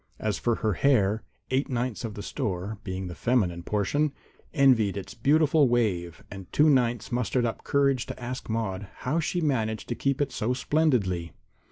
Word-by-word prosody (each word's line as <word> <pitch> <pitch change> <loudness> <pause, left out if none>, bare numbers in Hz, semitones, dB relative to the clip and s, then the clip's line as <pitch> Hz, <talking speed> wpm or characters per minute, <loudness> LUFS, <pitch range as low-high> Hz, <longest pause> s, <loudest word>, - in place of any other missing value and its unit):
As 105 -4 -2
for 120 -1 +1
her 105 - +3
hair, 110 -3 +2 0.3
eight 135 +3 +1
ninths 125 -2 -2
of 110 -3 -5
the 100 - -6
store, 100 +2 -3
being 95 0 -4
the 90 - -6
feminine 90 -4 0
portion, 120 - 0 0.4
envied 125 - +4
its 100 - -6
beautiful 150 +3 +3
wave, 90 -8 0
and 95 -2 -9
two 150 +1 +5
ninths 120 -3 +1
mustered 125 0 0
up 115 - -3
courage 140 -3 +1
to - - -7
ask 125 +1 -6
Maude 105 -3 -2 0.2
how 150 +6 +1
she 175 +2 -1
managed 110 - -1
to - - 0
keep 140 +2 0
it 145 - 0
so 120 +4 -1
splendidly. 115 - +1
120 Hz, 175 wpm, -27 LUFS, 100-135 Hz, 0.4 s, two